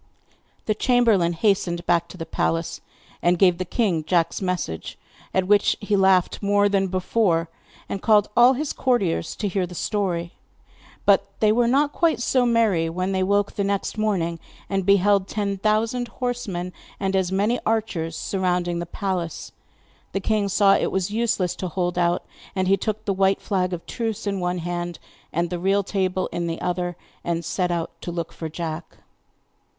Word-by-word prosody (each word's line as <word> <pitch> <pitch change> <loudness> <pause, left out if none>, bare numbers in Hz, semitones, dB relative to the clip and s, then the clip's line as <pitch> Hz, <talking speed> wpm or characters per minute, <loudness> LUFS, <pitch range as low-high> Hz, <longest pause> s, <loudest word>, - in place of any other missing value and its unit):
The 215 - +2
chamberlain 215 -7 +3
hastened 175 -2 0
back 170 -1 +2
to 185 - -11
the 165 - -5
palace, 165 0 -1 0.4
and 175 +1 +3
gave 180 -1 +4
the 185 - -2
king 180 -5 0
Jack's 170 +2 +1
message, 180 - -3 0.3
at 190 -1 +1
which 205 +1 +3
he 205 -1 0
laughed 190 -2 +3
more 205 0 +3
than 195 -1 +1
before, 185 -2 +1 0.4
and 195 - -4
called 210 -2 +4
all 245 +2 +7
his 290 +3 -2
courtiers 200 -11 0
to 210 - -2
hear 185 -1 -1
the 180 - -10
story. 175 -4 -2 0.7
But - - +4
they 215 -1 +4
were 235 +2 +3
not 285 +4 +2
quite 330 -8 +2
so 245 +1 +2
merry 215 -9 +2
when 185 +3 -2
they 190 -1 0
woke 200 +2 +1
next 200 0 -1
morning 185 -6 0 0.3
and 195 -1 -2
beheld 200 0 +4
ten 200 -2 -2
thousand 225 +4 +1
horsemen, 230 -8 -4 0.3
and 195 -1 -1
as 190 -1 +1
many 210 +6 +1
archers, 200 -8 -1
surrounding 180 -2 -1
the 170 - -4
palace. 180 -4 -3 0.6
The 195 - 0
king 205 0 0
saw 195 0 +5
it - - +1
was 190 +1 -1
useless 210 -5 0
to 185 - -3
hold 175 +1 -1
out, 175 0 +1 0.3
and 185 -1 0
he 195 - +5
took 215 +2 -3
the 200 - +1
white 195 +1 +2
flag 185 -2 -1
of 175 -2 -5
truce 225 -4 -3
in 200 -1 -1
one 180 0 -1
hand, 175 0 -4 0.3
and 170 +2 -1
the 175 - -2
real 195 +3 +2
table 190 -1 -1
in 175 0 -2
the 165 0 -3
other, 175 -1 -2 0.3
and 170 -1 -2
set 180 +1 -1
out 170 -1 -2
to - - -5
look 170 -1 -4
for 160 - -5
Jack. 160 0 -6
190 Hz, 175 wpm, -23 LUFS, 175-205 Hz, 0.7 s, all